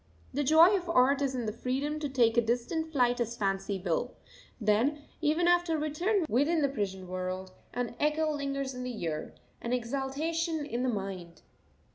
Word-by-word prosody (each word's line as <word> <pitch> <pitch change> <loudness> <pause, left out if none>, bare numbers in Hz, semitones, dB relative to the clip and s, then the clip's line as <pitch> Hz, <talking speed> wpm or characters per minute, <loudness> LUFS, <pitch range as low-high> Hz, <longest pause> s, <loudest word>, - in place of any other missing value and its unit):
The 290 +3 0
joy 320 +7 +7
of 355 -3 -3
art 275 -2 +4
is 270 -2 0
in 240 -3 -2
freedom 275 +6 -2
to 295 -2 -2
take 240 -4 +3
a 235 - +5
distant 245 +8 -1
flight 245 -4 +2
as 235 0 -2
fancy 195 -1 -1
will; 180 +7 -1 0.4
then, 235 +7 +2 0.2
even 320 +3 +2
after 350 -2 +3
return 335 +6 0
within 295 +5 +2
the 280 - +3
prison 190 -7 -3
world, 185 +1 -4 0.2
an 245 -1 -2
echo 305 +1 +2
lingers 275 -2 -2
in 250 - -6
the 250 -3 -5
ear, 155 -2 -3 0.3
an 235 - -2
exaltation 290 +6 -1
in 245 -4 -3
the 255 - +1
mind. 190 -6 -5
265 Hz, 170 wpm, -30 LUFS, 225-305 Hz, 0.4 s, joy